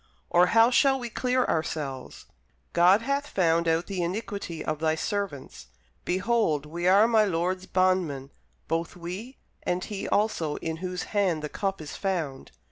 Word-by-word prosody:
or 175 +1 +5
how 230 +1 +5
shall 270 +1 +4
we 240 -2 -6
clear 255 +2 +1
ourselves? 150 -4 -3 0.5
God 185 +6 +5
hath 280 +3 -1
found 170 - +2
out 165 +1 +2
the 195 -3 -3
iniquity 180 -2 -4
of 155 -1 -2
thy 160 0 +1
servants: 170 - -4 0.4
behold, 185 -6 +1
we 170 +3 -3
are 200 +4 +6
my 225 -2 +4
lord's 185 0 -1
bondmen, 180 -8 +1 0.4
both 165 +1 -2
we, 185 +9 -7 0.2
and 180 0 -1
he 205 -2 -5
also 170 -8 +1
in 160 0 -4
whose 180 +1 -4
hand 185 -7 +1
the 150 - -3
cup 195 +3 -2
is 150 -2 -7
found. 165 -9 -3
180 Hz, 155 wpm, -27 LUFS, 160-205 Hz, 0.5 s, are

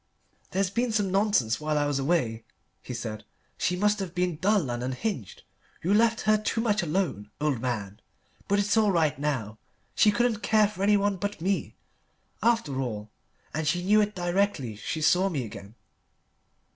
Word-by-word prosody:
"There's 190 0 0
been 235 +3 0
some 205 -3 +1
nonsense 195 - +2
while 150 0 0
I 145 - +2
was 145 -1 0
away," 135 -7 0 0.4
he - - -8
said; 115 -3 -5 0.3
"she 180 - 0
must 210 +2 +2
have 190 -2 -5
been 180 -3 0
dull 185 - +2
and 120 0 -3
unhinged 130 - -4 0.4
you 185 +5 +2
left 225 +1 +3
her 215 0 +3
too 215 +1 -1
much 215 -3 +1
alone, 160 - -1
old 145 -6 0
man. 110 -5 -3 0.5
But 200 - +2
it's 205 +2 +2
all 215 -2 +4
right 155 -6 +1
now. 120 -8 -2 0.3
She 215 - +5
couldn't 235 +1 +2
care 215 -2 +4
for 200 -2 -8
anyone 205 -1 +3
but 205 0 -3
me, 190 +4 -1 0.7
after 225 - +1
all, 105 -4 -5 0.4
and 155 0 -2
she 175 +3 +1
knew 210 +3 +5
it 210 0 -1
directly 175 - 0
she 155 +9 -4
saw 185 +4 +4
me 140 -9 -2
again. 105 0 -10
180 Hz, 170 wpm, -27 LUFS, 130-205 Hz, 0.7 s, She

